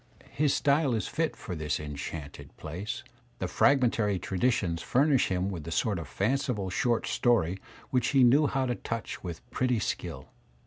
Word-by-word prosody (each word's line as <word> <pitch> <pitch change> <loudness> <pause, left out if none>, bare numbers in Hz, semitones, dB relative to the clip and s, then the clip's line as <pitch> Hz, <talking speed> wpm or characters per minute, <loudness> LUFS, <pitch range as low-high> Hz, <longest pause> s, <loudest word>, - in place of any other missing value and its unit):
His 145 -1 +2
style 140 -3 +2
is 110 - -2
fit 160 0 -1
for 90 - -6
this 75 -2 -2
enchanted 70 -1 -7
palace; 90 +8 -5 0.3
the - - -2
fragmentary 115 -7 +3
traditions 90 -3 0
fur 135 +4 +2
nish 140 -5 +3
him 95 +1 -1
with 85 -5 -5
the 85 - -7
sort 95 +3 0
of 80 - -7
fanciful 110 -3 -1
short 120 +4 +1
story 95 -7 +2 0.3
which 125 -1 +2
he 135 -2 +4
knew 140 +5 +5
how 135 -1 0
to 125 - 0
touch 115 -1 -5
with 85 -3 -7
pretty 125 -1 +1
skill. 85 -9 -4
110 Hz, 170 wpm, -29 LUFS, 85-130 Hz, 0.3 s, knew